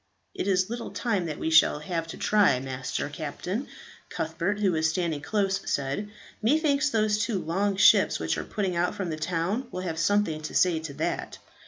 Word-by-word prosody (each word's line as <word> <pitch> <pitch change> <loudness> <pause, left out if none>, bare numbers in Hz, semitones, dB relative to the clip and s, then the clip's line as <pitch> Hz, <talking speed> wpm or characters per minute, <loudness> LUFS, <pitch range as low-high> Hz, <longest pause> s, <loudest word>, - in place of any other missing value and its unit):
"It - - -3
is 185 -1 +2
little 235 +1 -5
time 205 -8 -1
that 150 - -4
we 160 - -2
shall 160 - +6
have 165 +1 -3
to 165 - -8
try, 200 -12 +3
Master 130 +1 -4
Captain," 165 - -4 0.4
Cuthbert, 170 +4 -2
who 200 -3 +2
was 160 -1 +1
standing 165 -3 -1
close, 195 +3 0
said. 140 +9 -2 0.3
"Methinks 295 +4 +2
those 215 -3 +1
two 210 0 0
long 195 +4 0
ships 195 - +5
which - - -1
are - - -3
putting 195 -5 -2
out 175 +1 0
from 185 -4 -3
that 155 0 -5
town 185 +9 -1
will 185 - -4
have 165 -3 -3
something 185 -4 +1
to 155 - -6
say 175 -3 +3
to 160 -3 -7
that." - - -3
185 Hz, 190 wpm, -27 LUFS, 160-205 Hz, 0.4 s, shall